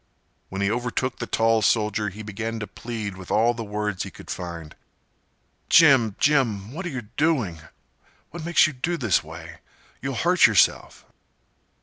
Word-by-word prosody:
When 95 +1 -3
he 100 - +1
overtook 125 +2 -2
the 120 - -4
tall 115 0 +2
soldier 105 -1 +1
he 105 +3 -9
began 115 +2 -5
to 105 - -4
plead 110 -3 -6
with 95 -1 -11
all 115 +3 +3
the 115 -1 -6
words 105 -2 -3
he - - -4
could - - -11
find. 85 -3 -7 0.9
"Jim—Jim—what 135 - +3
are - - -3
you 130 -6 -5
doing—what 140 - -4
makes 170 +1 +4
you 155 - -2
do 170 +7 -2
this 110 - +1
way—you'll 80 -5 -10
hurt - - +4
yerself." - - +1
110 Hz, 140 wpm, -24 LUFS, 100-125 Hz, 0.9 s, makes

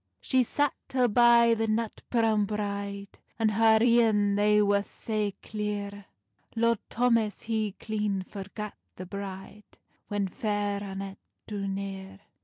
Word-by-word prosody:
She 260 -1 +2
sat 290 +3 +1 0.2
her 250 -2 +4
by 235 +1 +6
the 225 0 0
nut 220 0 -1
browne 225 -3 +2
bride, 200 -1 -4 0.2
And 220 -1 +2
her 220 +1 +5
een 225 -4 +4
they 210 +1 +4
wer 205 -1 +3
sae 210 0 -3
clear, 205 -1 -4 0.5
Lord 230 -1 +2
Thomas 230 -3 +1
he 220 -3 -1
clean 210 -3 -2
forgat 210 +1 -7 0.2
the 185 - -7
bride, 200 +2 -8 0.3
When 205 -1 -1
Fair 205 +1 -2
Annet 195 0 -6 0.3
drew 200 -2 -4
near. 195 0 -5
210 Hz, 130 wpm, -28 LUFS, 200-225 Hz, 0.5 s, by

